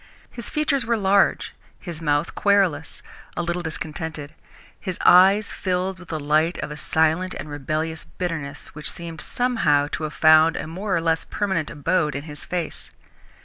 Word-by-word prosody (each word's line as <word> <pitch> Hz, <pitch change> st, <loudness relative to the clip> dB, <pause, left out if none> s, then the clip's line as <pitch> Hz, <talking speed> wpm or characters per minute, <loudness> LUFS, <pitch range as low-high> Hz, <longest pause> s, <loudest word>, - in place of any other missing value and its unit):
His 235 Hz, -, -8 dB
features 300 Hz, -3 st, +1 dB
were 235 Hz, 0 st, +1 dB
large, 200 Hz, -1 st, +2 dB, 0.3 s
his 170 Hz, -3 st, -7 dB
mouth 145 Hz, 0 st, 0 dB
querulous, 195 Hz, -7 st, +1 dB, 0.3 s
a 175 Hz, -, 0 dB
little 175 Hz, +1 st, -2 dB
discontented, 155 Hz, -2 st, -5 dB, 0.5 s
his 185 Hz, -2 st, -4 dB
eyes 195 Hz, +4 st, +6 dB
filled 185 Hz, 0 st, -2 dB
with 180 Hz, -, -13 dB
the 160 Hz, -1 st, -3 dB
light 155 Hz, +4 st, +1 dB
of -, -, -5 dB
a -, -, -5 dB
silent 160 Hz, +4 st, +1 dB
and -, -, -6 dB
rebellious 155 Hz, +3 st, -3 dB
bitterness 160 Hz, -4 st, -5 dB
which 150 Hz, 0 st, -3 dB
seemed, 165 Hz, -2 st, -8 dB
somehow, 220 Hz, -, +1 dB
to -, -, -3 dB
have 155 Hz, -1 st, -4 dB
found 155 Hz, +1 st, +6 dB
a -, -, -3 dB
more 190 Hz, +5 st, -3 dB
or 170 Hz, -, +1 dB
less 165 Hz, 0 st, +1 dB
permanent 190 Hz, -7 st, -1 dB
abode 150 Hz, -1 st, 0 dB
in 140 Hz, -, -4 dB
his 150 Hz, -2 st, -7 dB
face. 175 Hz, -3 st, -4 dB
165 Hz, 165 wpm, -23 LUFS, 155-185 Hz, 0.5 s, eyes